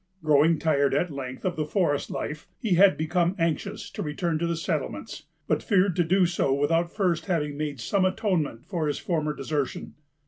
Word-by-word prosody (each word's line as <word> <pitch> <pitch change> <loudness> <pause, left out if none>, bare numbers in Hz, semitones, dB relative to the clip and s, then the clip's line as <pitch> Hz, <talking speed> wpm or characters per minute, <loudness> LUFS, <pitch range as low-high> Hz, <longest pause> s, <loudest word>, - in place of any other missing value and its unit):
Growing 155 +2 +4
tired, 140 -4 +2
at 170 +3 0
length, 130 +1 -6
of 180 - 0
the 155 - -1
forest 150 -2 0
life, 150 +1 -5
he 215 -5 0
had 190 +2 +6
become 170 +3 +1
anxious 165 -2 -2
to - - -5
return 155 +2 -1
to 170 - 0
the 170 - 0
settlements, 165 - -4 0.2
but - - +1
feared 190 -4 +2
to 175 - +3
do 185 +3 +3
so 170 -5 0
without 165 +5 +1
first 185 -5 0
having 150 -6 -1
made 145 -2 -3
some 185 - +1
atonement 185 - 0
for 170 -5 -2
his 145 - -1
former 155 -4 -1
desertion. 140 0 -3
165 Hz, 185 wpm, -26 LUFS, 150-180 Hz, 0.2 s, had